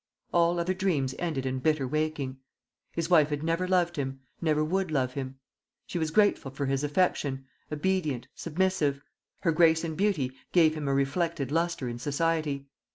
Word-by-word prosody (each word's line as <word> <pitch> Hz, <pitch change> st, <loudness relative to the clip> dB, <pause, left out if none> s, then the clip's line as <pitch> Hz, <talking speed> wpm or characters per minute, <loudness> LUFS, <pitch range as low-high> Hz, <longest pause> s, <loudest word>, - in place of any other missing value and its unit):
All 170 Hz, 0 st, +3 dB
other 175 Hz, +2 st, +1 dB
dreams 170 Hz, -9 st, 0 dB
ended 155 Hz, -7 st, -2 dB
in 130 Hz, 0 st, -1 dB
bitter 150 Hz, -1 st, +1 dB
waking. 150 Hz, -2 st, -2 dB, 0.5 s
His 165 Hz, -1 st, -2 dB
wife 160 Hz, -4 st, +5 dB
had 145 Hz, 0 st, -2 dB
never 165 Hz, +3 st, 0 dB
loved 175 Hz, -2 st, +2 dB
him, 135 Hz, -1 st, -3 dB, 0.2 s
never 155 Hz, -2 st, +2 dB
would 185 Hz, +3 st, 0 dB
love 130 Hz, -4 st, 0 dB
him. 135 Hz, -1 st, -5 dB, 0.5 s
She 175 Hz, -, -3 dB
was 160 Hz, -1 st, 0 dB
grateful 205 Hz, -5 st, +3 dB
for 140 Hz, +2 st, -3 dB
his 135 Hz, +1 st, 0 dB
affection, 145 Hz, -4 st, 0 dB, 0.3 s
obedient, 150 Hz, -5 st, -1 dB
submissive; 160 Hz, -5 st, 0 dB, 0.4 s
her 165 Hz, -, +2 dB
grace 160 Hz, 0 st, +4 dB
and 160 Hz, -2 st, -3 dB
beauty 175 Hz, -9 st, +1 dB, 0.2 s
gave 160 Hz, -3 st, +5 dB
him 155 Hz, -2 st, -4 dB
a 140 Hz, -, +2 dB
reflected 140 Hz, 0 st, 0 dB
lustre 165 Hz, -4 st, 0 dB
in 120 Hz, 0 st, -5 dB
society. 145 Hz, 0 st, 0 dB
155 Hz, 165 wpm, -28 LUFS, 140-170 Hz, 0.5 s, wife